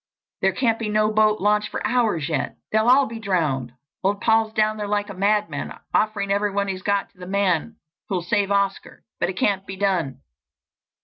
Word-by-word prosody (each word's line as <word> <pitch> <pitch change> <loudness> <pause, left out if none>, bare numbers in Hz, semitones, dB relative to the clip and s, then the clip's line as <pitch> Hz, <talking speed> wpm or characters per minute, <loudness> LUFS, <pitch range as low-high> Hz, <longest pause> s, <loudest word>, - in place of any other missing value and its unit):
There 190 - +3
can't 225 +2 +1
be 220 -2 -2
no 215 0 +2
boat 215 0 +3
launched 210 +1 +2
for - - -4
hours 220 - +1
yet—they'll 220 +7 -1
all 265 +3 +6
be 230 -2 -7
drowned. 155 - -1 0.3
Old 200 +1 +1
Paul's 220 0 +2
down 215 0 +1
there 210 -1 -3
like 205 0 -1
a - - -7
madman—offering 205 +1 -1
everything 200 0 0
he's 185 -1 -4
got 200 0 0
to 185 - -29
the 180 - -8
man 195 +1 0 0.3
who'll 185 -3 -1
save 200 +3 +1
Oscar, 200 -1 -1 0.2
but - - +1
it 185 - -5
can't 195 -1 +1
be 190 - -6
done." 175 -9 -1
200 Hz, 180 wpm, -23 LUFS, 190-215 Hz, 0.3 s, all